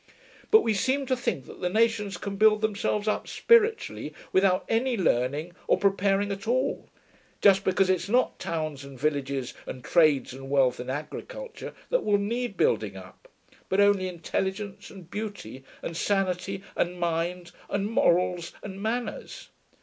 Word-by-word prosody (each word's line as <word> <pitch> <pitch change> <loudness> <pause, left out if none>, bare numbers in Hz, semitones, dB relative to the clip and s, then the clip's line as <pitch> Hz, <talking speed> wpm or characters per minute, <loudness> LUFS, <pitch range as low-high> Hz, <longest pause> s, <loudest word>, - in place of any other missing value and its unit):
But 440 0 +7
we 225 - +1
seem 260 +7 +1
to 260 0 +1
think 240 - -2
that - - -12
the 180 - 0
nations 215 -1 +1
can 200 -1 -5
build 215 +1 +4
themselves 210 0 -1
up 215 - 0
spiritually 460 -1 +2 0.2
without 190 0 +3
any 240 +2 +1
learning 150 0 0
or - - +4
preparing 200 0 +2
at 200 +2 -5
all, 255 +3 0 0.5
just 195 -1 +5
because 190 0 +2
it's 185 +1 0
not 250 +3 +2
towns 155 -4 -3
and 140 -2 -11
villages 140 -3 -1
and 125 - -7
trades 150 -6 +3
and 135 +1 -9
wealth 135 -3 +3
and 125 +1 -5
agriculture 465 - -6 0.2
that - - +2
will 205 -1 +3
need 230 +2 -2
building 475 +2 +1
up, - - -13 0.4
but 190 - +1
only 200 -2 +4
intelligence 190 +3 -4
and 180 -3 -13
beauty 200 - -6 0.2
and 165 - -4
sanity 195 0 -1
and 180 +1 -1
mind 175 +1 -2 0.2
and 200 0 -1
morals 180 -4 +1
and 195 -1 -7
manners. 235 +3 -4
195 Hz, 155 wpm, -27 LUFS, 170-215 Hz, 0.5 s, But